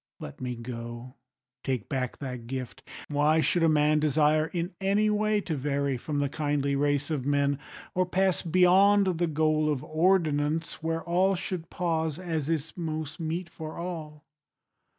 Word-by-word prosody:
Let 70 - -9
me 125 -1 -3
go: 120 +1 -7 0.5
take 130 -6 -2
back 130 -2 -2
thy 130 -3 -5
gift: 125 +1 -6 0.3
Why 150 +2 +3
should 170 +2 +2
a 165 - +5
man 150 0 +3
desire 155 +1 +3
in 175 +2 -3
any 205 +2 +2
way 210 0 +1
To 165 -5 -3
vary 140 0 -1
from 145 +4 -4
the 145 0 +1
kindly 145 -1 -1
race 145 +1 0
of 145 -5 -1
men, 140 0 +2 0.3
Or 185 0 +1
pass 190 0 +1
beyond 185 +1 +4
the 175 - +2
goal 155 0 +2
of 135 -3 -2
ordinance 160 -2 +1
Where 165 0 -2
all 185 +2 +2
should 175 -2 -5
pause, 160 -3 -1
as 165 -5 -3
is 160 -1 -1
most 155 -3 -4
meet 165 +2 -3
for 160 -1 -8
all? 160 -3 -6
155 Hz, 160 wpm, -28 LUFS, 145-175 Hz, 0.5 s, a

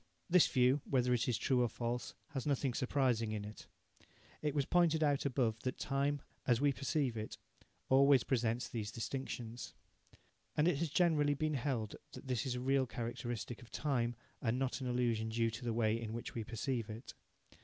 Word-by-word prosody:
This 180 -2 +6
view, 130 +2 +3
whether 125 -2 +2
it 120 -1 +1
is 120 -3 +1
true 130 -2 +2
or 120 - +2
false, 120 +2 -3
has 135 0 -4
nothing 135 -2 +1
surprising 125 -4 +1
in 105 -1 -3
it. 105 0 -10 0.7
It 150 -1 -1
was 140 -2 +2
pointed 165 -2 +3
out 145 -2 +2
above 120 -4 0
that 130 +2 -3
time, 140 0 0 0.2
as 120 -2 +4
we 145 0 +3
perceive 135 -2 0
it, 110 -1 -5 0.5
always 135 -1 +6
presents 120 -2 0
these 110 -3 -4
distinctions. 120 0 -5 0.8
And 150 +2 +4
it 155 -6 +2
has 165 -1 0
generally 150 -3 +3
been 155 +2 0
held 120 -6 -2 0.2
that - - -9
this 125 -1 0
is 125 - -1
a - - -2
real 135 +1 +2
characteristic 120 0 -4
of 120 - -14
time, 120 -5 0 0.3
and 115 +1 +1
not 135 +1 -1
an 130 - -2
illusion 120 -3 +1
due 115 0 +1
to 115 +2 -7
the 120 - -1
way 115 0 +1
in 110 -1 -4
which 115 - -5
we 115 - -3
perceive 115 +1 -2
it. 110 +3 -8
125 Hz, 185 wpm, -36 LUFS, 115-140 Hz, 0.8 s, This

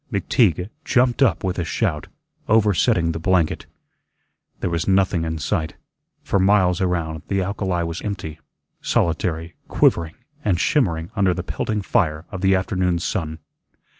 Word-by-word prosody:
McTeague 100 - +1
jumped 125 0 +2
up 135 - +3
with 95 -1 -2
a - - 0
shout, 75 -2 -2 0.4
oversetting 100 -6 +3
the 80 - -4
blanket. 85 -1 +1 0.9
There - - -1
was 85 -1 -1
nothing 95 -3 +2
in 80 0 -3
sight. 80 -2 -2 0.5
For 100 - +1
miles 95 -2 +3
around, 85 -4 -1
the 95 -1 0
alkali 95 -2 -1
was 85 0 -4
empty, 90 -7 -5 0.4
solitary, 85 0 -1
quivering 80 -1 +2 0.3
and 90 -5 +1
shimmering 90 - +1
under 95 -3 +2
the - - -4
pelting 105 -2 -2
fire 80 -4 0
of 95 -3 -6
the 95 0 +4
afternoon's 90 -3 0
sun. 80 -3 -2
90 Hz, 140 wpm, -22 LUFS, 80-100 Hz, 0.9 s, the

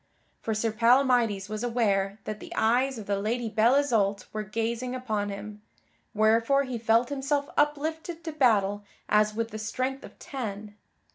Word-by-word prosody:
For 220 - -2
Sir 220 +1 0
Palamydes 235 -3 +3
was 215 +2 -4
aware 205 -5 +1
that 215 0 -5
the - - -11
eyes 250 +4 +2
of 215 - -7
the 200 0 -1
Lady 230 +2 -1
Belle 225 +4 +3
Isoult 215 -8 +1
were 215 - -2
gazing 230 +4 -3
upon 215 -5 -2
him, 205 +1 -7 0.5
wherefore 230 +6 +3
he 255 -3 -4
felt 230 +2 +3
himself 285 +1 -1
uplifted 315 +3 -1
to 320 - -4
battle 205 -8 +2 0.2
as 210 0 +3
with 230 0 -2
the 215 - -6
strength 255 +5 -3
of - - -12
ten. 210 -6 -6
230 Hz, 160 wpm, -27 LUFS, 210-255 Hz, 0.5 s, Palamydes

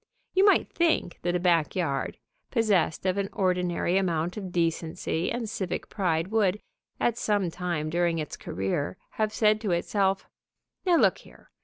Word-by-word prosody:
You 380 - +4
might 405 - +5
think 330 - 0
that 175 +1 0
a - - +2
back 170 -3 +2
yard, 140 -7 -1 0.3
possessed 205 -9 +1
of 185 +1 +1
an 195 0 -1
ordinary 180 -1 +1
amount 170 -2 -1
of 195 -4 -6
decency 165 0 -1
and 235 -2 -2
civic 190 -4 -4
pride 175 -4 0
would, 210 -2 +2 0.4
at 235 0 +1
some 205 -5 +1
time 165 -3 -2
during 170 0 +1
its 155 -2 -4
career, 95 - -3 0.2
have 215 -1 +2
said 215 0 +3
to 215 - -2
itself: 190 +2 +1 0.6
"Now 355 - +5
look - - +4
here! - - -18
180 Hz, 160 wpm, -27 LUFS, 170-210 Hz, 0.6 s, might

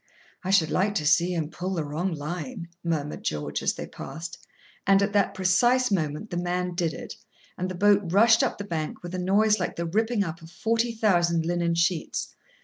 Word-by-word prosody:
"I 185 - -3
should 180 -5 +3
like 205 +2 +1
to 155 - 0
see 170 +3 +4
him 160 -2 -2
pull 185 +3 -3
the 165 - -1
wrong 160 +6 -2
line," 175 - -5
murmured 155 -3 -2
George, 75 -1 -2
as - - 0
they - - -5
passed. 160 +5 -8 0.5
And 195 0 +6
at 200 0 -1
that 200 -1 +2
precise 240 +7 +3
moment 160 +2 -1
the 175 - -2
man 180 0 -1
did 170 -2 0
it, - - -7 0.4
and 185 +1 -3
the 185 - -5
boat 205 +2 +4
rushed 225 +4 +6
up - - 0
the 205 - -5
bank 165 -5 -4
with 175 +1 -7
a 185 - -2
noise 210 +3 +3
like 180 - -2
the 170 - -3
ripping 220 +5 +1
up 165 -2 -6
of 165 - -12
forty 230 +6 0
thousand 175 -7 +2
linen 170 0 0
sheets. 170 -1 -1
180 Hz, 205 wpm, -26 LUFS, 165-200 Hz, 0.5 s, And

